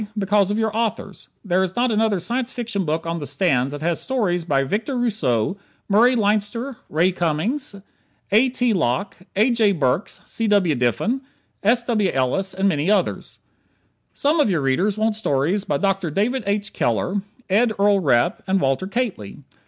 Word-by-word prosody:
Because 200 -1 +2
of 205 - -1
your 220 -1 -1
authors. 225 -1 -3 0.2
There 185 -1 +2
is 190 -1 -2
not 245 0 +1
another 215 -2 +2
Science 235 +8 -1
Fiction 225 -6 -3
book 160 +2 -2
on 165 0 -2
the 145 - -5
stands 140 -8 +1
that 145 +1 -6
has 170 0 0
stories 200 -10 -1
by 140 -4 +1
Victor 225 - -2
Rousseau, 185 - 0 0.3
Murray 235 +5 +4
Leinster 215 +4 0
Ray 170 +5 +2
Cummings, 180 - -2 0.6
A. 230 +6 +5
T. 245 -2 +1
Locke, 145 0 -1 0.2
A. 220 +6 +3
J. 220 -4 +3
Burks, 150 +2 -1
C. 225 - -3
W. 200 -6 +3
Diffin, 140 - 0 0.4
S. 235 +4 +3
W. 215 -5 +1
Ellis 185 +9 -1
and 190 +1 +1
many 155 -1 0
others. 205 -3 0 0.8
Some 300 +3 +1
of 290 - +3
your 170 -6 +1
readers 180 +10 +1
want 220 0 +1
stories 190 0 0
by 145 - 0
Dr. 195 +1 0
David 220 - -1
H. 200 0 -1
Keller, 180 - 0 0.3
Ed 220 +4 +3
Earl 200 0 +3
Repp 120 -7 +2
and 190 +1 +2
Walter 135 +5 0
Kately. 200 - -4
200 Hz, 170 wpm, -21 LUFS, 165-225 Hz, 0.8 s, A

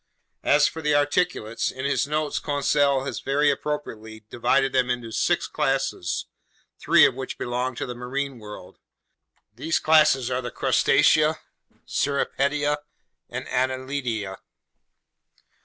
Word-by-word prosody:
As 145 0 +4
for 160 - -6
the 150 -1 +1
articulates, 145 -6 0
in 130 +1 -6
his 140 0 +1
notes 150 0 -1
Conseil 145 -2 +1
has 140 - -4
very 145 +2 +2
appropriately 110 -7 -5
divided 125 +3 +1
them 130 -1 +2
into 120 -2 -3
six - - +1
classes, 135 -9 -1 0.5
three - - +6
of - - +2
which 130 +1 -6
belong 125 +1 -2
to - - -4
the 125 - -5
marine 130 +2 -4
world. 105 -4 -11 0.7
These 140 +9 -1
classes 150 -5 +4
are 125 0 -1
the 120 - -5
Crustacea, 155 +1 +3 0.5
Cirripedia, 145 +1 0 0.5
and - - -6
Annelida. 130 -6 -2
135 Hz, 125 wpm, -24 LUFS, 125-145 Hz, 0.7 s, three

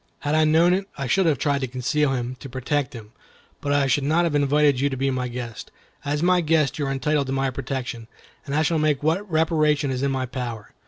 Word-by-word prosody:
Had 145 +1 -1
I 155 0 +4
known 165 +3 +4
it, 195 +1 -1
I 140 - -3
should 185 +8 +2
have 150 -4 +2
tried 140 0 0
to 130 - -1
conceal 135 +3 0
him, 125 0 -3
to 135 - -9
protect 135 +2 -2
him; 110 -3 -10 0.5
but 145 - -2
I 145 -1 +3
should 135 +1 +1
not 160 +5 +2
have 170 -3 0
invited 145 -1 +3
you 140 +2 +2
to 130 - -4
be 135 +1 0
my 130 -1 -2
guest. 120 -2 -7 0.3
As 145 +2 -1
my 180 0 +4
guest, 155 -4 +1
you 145 - -1
are - - -1
entitled 140 +1 0
to 135 - -2
my 135 0 0
protection, 125 -3 -5 0.4
and 140 - -2
I 155 - +3
shall 160 +1 +1
make 150 -2 +1
what 180 +7 0
reparation 155 -3 +2
is 130 -1 -2
in 140 - +1
my 130 -1 -1
power." 120 -5 -6
140 Hz, 245 wpm, -23 LUFS, 130-155 Hz, 0.5 s, I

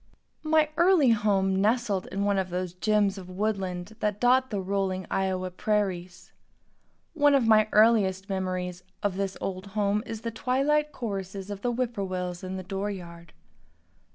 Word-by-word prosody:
My 310 -1 +3
early 340 -7 +5
home 195 -3 +2
nestled 215 -3 +1
in 200 +1 -3
one 200 -1 +2
of 185 -1 -2
those 180 0 -3
gems 200 +1 +1
of 185 -1 -11
woodland 190 0 -3
that 210 -2 -1
dot 255 +2 +4
the 205 - -2
rolling 190 -1 -1
Iowa 185 -1 -1
prairies. 185 -2 -2 0.8
One 290 -3 +4
of 265 -4 +3
my 215 -1 +5
earliest 205 -3 +4
memories 185 -2 -3 0.2
of 200 -2 0
this 195 -1 -2
old 190 0 -4
home 205 0 +2
is 225 -1 -5
the 230 - -3
twilight 285 +5 +1
choruses 195 -5 -5
of 200 -1 -6
the 245 - 0
whippoorwills 190 -8 -3
in 185 0 -4
the 185 - -6
door 195 +2 -3
yard. 170 -4 -9
200 Hz, 155 wpm, -27 LUFS, 185-225 Hz, 0.8 s, early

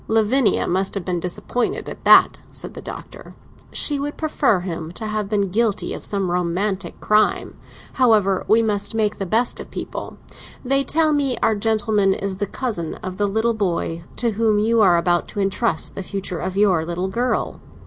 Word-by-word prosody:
"Lavinia 225 +2 +2
must 190 +3 0
have 195 -4 -4
been 180 -2 -1
disappointed 180 +7 -2
at - - -8
that," - - +7
said - - -7
the - - -8
Doctor; - - -10 0.4
"she 290 -2 +2
would 290 +1 -4
prefer 280 - +1
him 165 -3 -5
to 220 - -5
have 215 -2 -2
been 200 -3 0
guilty 220 0 0
of - - -7
some 195 -3 -1
romantic 180 +2 -1
crime. 215 0 +2 0.4
However, 215 -7 +3
we 225 +1 +4
must 210 0 -1
make 215 -1 0
the 195 - -3
best 230 +6 +1
of - - -8
people. - - -6 0.5
They 275 +2 +3
tell 310 +1 +2
me 275 -4 0
our 220 - +4
gentleman 210 -2 +2
is 195 -1 -4
the 205 +1 -2
cousin 215 -11 -4
of 185 0 -7
the 205 0 +1
little 220 +3 +1
boy 170 -5 -2
to 235 -2 0
whom 215 0 +1
you 225 +2 +3
are 180 -4 +5
about 175 0 +1
to - - -6
entrust 200 +4 0
the - - -5
future 190 -2 -4
of 185 +1 -4
your 190 -6 +3
little 175 +3 -3
girl." 240 +6 -2
205 Hz, 185 wpm, -21 LUFS, 185-225 Hz, 0.5 s, that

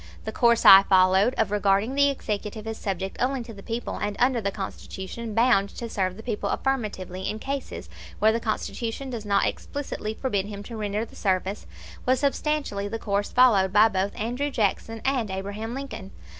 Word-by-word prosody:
The 220 - -3
course 235 +1 +3
I 195 0 +11
followed, 190 +5 +4
of 200 - 0
regarding 205 +3 +2
the 280 0 +4
executive 215 -4 -4
as 225 0 -5
subject 190 -1 -3
only 260 0 0
to 230 -1 -10
the 200 - -11
people, 235 +3 -4
and, 205 0 -2
under 250 -1 +2
the 200 - 0
Constitution, 200 +2 -6
bound 230 -4 +4
to 235 - -4
serve 185 -4 -2
the 220 - -10
people 210 -4 -2
affirmatively 195 -9 -2
in 215 - -3
cases 275 +4 -5 0.3
where 215 +1 +4
the 230 - 0
Constitution 230 +3 -3
does 225 -3 -5
not 200 -1 +2
explicitly 245 -6 -4
forbid 205 -7 -1
him 205 -1 -7
to 230 - -8
render 210 0 -2
the - - -17
service, 190 0 -1 0.4
was 255 0 +2
substantially 280 -7 -1
the 225 +3 -4
course 205 -2 -1
followed 210 -7 +5
by 210 +2 +6
both 195 0 -2
Andrew 245 +7 -1
Jackson 225 -1 -1
and 260 -6 +1
Abraham 200 +5 -4
Lincoln. 270 -8 -6
215 Hz, 185 wpm, -25 LUFS, 200-240 Hz, 0.4 s, I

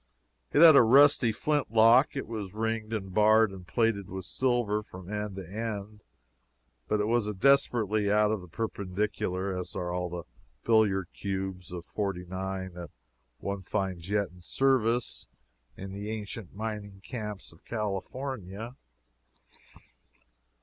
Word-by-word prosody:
It 150 - +6
had 160 -3 +10
a - - +9
rusty 130 0 +6
flint 145 +6 0
lock; 115 +6 +5
it 135 - -3
was 105 -4 -6
ringed 110 0 -2
and 95 -4 -4
barred 110 +1 +5
and 95 -2 -11
plated 115 -4 0
with 95 0 -6
silver 120 -2 0
from 95 -1 -10
end 105 -2 -3
to 95 -3 -7
end, 105 0 -5 0.9
but 105 - +1
it 105 - +1
was 115 -1 +1
as 105 - -3
desperately 110 -4 +3
out 105 0 +4
of 110 -3 -1
the 90 - -11
perpendicular 95 -1 -2
as 90 0 -6
are 90 -1 -2 0.2
the 85 0 -5 0.4
billiard 100 -6 +3
cues 95 -2 -4
of 85 -1 -6
'49 95 -1 -4
that 85 -2 -8 0.5
one 100 +7 -4
finds 95 -2 -3
yet 100 -2 +1
in 90 0 -17
service 120 - +1 0.5
in 95 0 -7
the 100 +2 -5
ancient 105 -3 -6
mining 105 -2 -5
camps 105 -4 -6
of 80 - -21
California. 110 +1 -4
105 Hz, 140 wpm, -29 LUFS, 95-115 Hz, 0.9 s, had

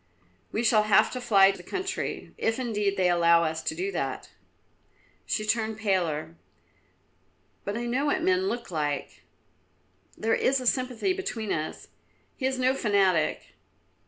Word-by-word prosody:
"We 225 - -1
shall 215 -2 +4
have 215 +1 +5
to 255 - -5
fly 195 -5 +5
the 195 - -10
country, 380 - -4
if 225 0 0
indeed 210 -6 -1
they 185 -1 +3
allow 170 -1 +4
us 160 0 -2
to 320 - -3
do 375 +4 -2
that." - - -4 1.0
She 215 - -1
turned 220 0 0
paler. 170 -6 -1 1.3
"But 205 +2 -2
I 240 - -3
know 255 +5 0
what 340 +4 0
men 370 +1 +2
look 240 - -4
like; 145 -3 -3 1.0
there 225 +1 0
is 270 +1 +2
a 255 - -6
sympathy 255 - 0
between 370 - -4
us; 155 0 -5 0.5
he 260 - -1
is 265 0 -2
no 255 +1 +2
fanatic." 200 -9 +1
220 Hz, 150 wpm, -27 LUFS, 185-260 Hz, 1.3 s, have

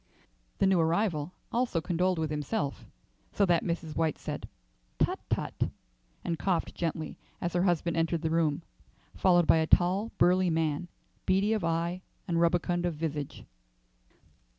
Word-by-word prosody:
The - - +3
new 190 -2 +4
arrival 165 -1 +1 0.2
also 240 -7 +1
condoled 180 +2 0
with 160 -1 -1
himself, 150 +2 -2 0.4
so 200 - +3
that 175 -3 +3
Mrs. 170 -2 -3
White 160 -2 +1
said, - - -6 0.5
"Tut, - - +1
tut!" - - -1 0.6
and 170 -2 -1
coughed 185 -4 0
gently 160 -2 -3 0.2
as 175 - -2
her 175 - +2
husband 170 -2 +1
entered 165 0 0
the 160 - 0
room, 165 -1 +1 0.5
followed 175 -2 +4
by 160 - +5
a 160 0 +1
tall, 185 +7 +3
burly 180 +1 +4
man, 160 0 0 0.4
beady 195 +4 +3
of 215 -4 -1
eye 170 +2 -1 0.3
and 170 -2 +1
rubicund 175 +1 +2
of 170 - -2
visage. 150 -2 -4
170 Hz, 150 wpm, -30 LUFS, 160-180 Hz, 0.6 s, by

